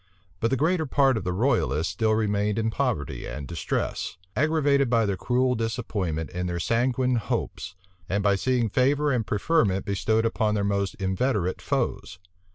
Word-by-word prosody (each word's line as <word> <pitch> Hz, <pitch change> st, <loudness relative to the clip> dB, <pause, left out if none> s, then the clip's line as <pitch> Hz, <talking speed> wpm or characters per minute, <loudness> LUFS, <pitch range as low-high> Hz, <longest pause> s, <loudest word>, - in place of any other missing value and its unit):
But 115 Hz, -, +1 dB
the 135 Hz, -, +1 dB
greater 160 Hz, +2 st, +1 dB
part 135 Hz, -1 st, +3 dB
of 110 Hz, -, -2 dB
the 90 Hz, -, -1 dB
royalists 90 Hz, -, +1 dB
still 110 Hz, +3 st, +1 dB
remained 105 Hz, -1 st, 0 dB
in 115 Hz, 0 st, 0 dB
poverty 120 Hz, -, -2 dB
and 70 Hz, +2 st, -6 dB
distress, 85 Hz, 0 st, -3 dB, 0.2 s
aggravated 145 Hz, -1 st, +2 dB
by 115 Hz, -2 st, +3 dB
the 100 Hz, -1 st, 0 dB
cruel 125 Hz, +5 st, +1 dB
disappointment 105 Hz, -9 st, -2 dB
in 90 Hz, 0 st, -3 dB
their 85 Hz, 0 st, -2 dB
sanguine 125 Hz, +5 st, +1 dB
hopes, 90 Hz, -3 st, -3 dB, 0.3 s
and 100 Hz, +2 st, 0 dB
by 100 Hz, -1 st, +4 dB
seeing 125 Hz, +3 st, +1 dB
favor 140 Hz, +6 st, +2 dB
and 120 Hz, -5 st, 0 dB
preferment 105 Hz, -, +1 dB
bestowed 110 Hz, +3 st, +1 dB
upon 110 Hz, -2 st, +1 dB
their 100 Hz, -, 0 dB
most 100 Hz, -1 st, -1 dB
inveterate 95 Hz, -1 st, -1 dB
foes. 90 Hz, -, -2 dB
110 Hz, 165 wpm, -26 LUFS, 95-130 Hz, 0.3 s, by